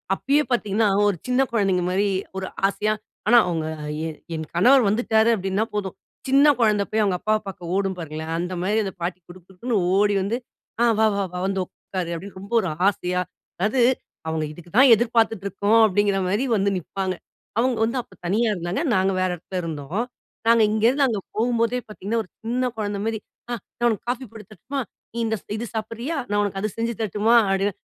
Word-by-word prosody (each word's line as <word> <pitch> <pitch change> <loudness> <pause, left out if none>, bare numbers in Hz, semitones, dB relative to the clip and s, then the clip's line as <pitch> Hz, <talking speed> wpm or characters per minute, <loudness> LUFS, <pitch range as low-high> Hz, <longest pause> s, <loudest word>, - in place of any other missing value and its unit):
அப்பயே 280 +8 +2
பார்த்தீங்கன்னா 215 -2 +2 0.2
ஒரு 205 - +2
சின்ன 250 +1 +3
குழந்தைங்க 195 -5 +2
மாரி 200 +2 +2 0.3
ஒரு 190 0 -3 0.2
ஆசையா, 205 +2 0 0.3
ஆனா 240 +2 +7
அவங்க 165 -3 -1 0.4
என் 155 -2 -8 0.2
என் 160 -1 -5
கணவர் 250 +9 +6
வந்துட்டாரு 220 0 +3
அப்படின்னா 195 +1 -1
போதும் 195 -2 -2 0.3
சின்ன 275 +2 +6
குழந்த 210 -3 +3
போய் 215 0 +2
அவங்க 190 -3 +1
அப்பாவ 215 +2 +1
பார்க்க 180 -3 -6
ஓடும் 195 -1 0
பாருங்களேன்! 160 0 -5
அந்த 180 +1 -3
மாரி 205 +4 +1
அந்த 195 -2 -4
பாட்டி 175 +1 -2
குடுகுடுன்னு 185 +6 -5 0.2
ஓடி 205 +1 +3
வந்து, 205 +5 -1 0.4
ஆ - - +5
"வா 220 - +5
வா 200 - 0
வா 180 - -3
வந்து 195 0 -1
உட்காரு" 180 -1 -6
அப்படின்னு 190 +3 -8
ரொம்ப 200 +4 -9
ஒரு 185 - -2 0.2
ஆசையா, 180 -2 0 0.4
அதாது 215 +7 +1 0.5
அவங்க 160 -1 -1
இதுக்கு 175 +2 -13
தான் 260 0 +8
எதிர்பார்த்துட்டு 225 -3 +1
இருக்கோம், 200 +3 +2
அப்படிங்கிற 205 -1 +2
மாரி 210 +8 +1
வந்து 200 0 +2
நிப்பாங்க. 185 +2 -3 0.4
அவங்க 255 +1 +2
வந்து 235 +3 -2
அப்ப - - -21
தனியா 215 +7 +2
இருந்தாங்க. 175 - -2
நாங்க 190 +1 +2
வேற 185 - +2
இடத்துல 185 +2 -5
இருந்தோம். 160 +6 -3 0.4
நாங்க 230 0 +6
இங்கே 220 +1 +1
இருந்து 275 +2 +3
அங்க 220 -5 -1 0.2
போகும்போதே 230 +1 +1
பார்த்தீங்கன்னா 210 +2 -3
ஒரு - - -20
சின்ன 245 +3 0
குழந்த 205 -2 -2
மாரி, 225 -1 -1 0.3
ஆ - - 0 0.3
"நான் 240 - +3
உனக்கு 220 - -3
காஃபி 255 +1 -2
போட்டு 220 -3 -11
தரட்டுமா? 260 +8 -5 0.3
நீ - - -8
இந்த 220 0 0 0.2
இது 235 - -3
சாப்பிடுறியா? 230 +7 -3
நான் 205 0 +2
உனக்கு 195 -1 -2
அது 215 - 0
செஞ்சு 230 +1 -1
தரட்டுமா?" 215 +2 +2
அப்படின்னு 195 +1 +1
205 Hz, 185 wpm, -23 LUFS, 185-230 Hz, 0.5 s, தான்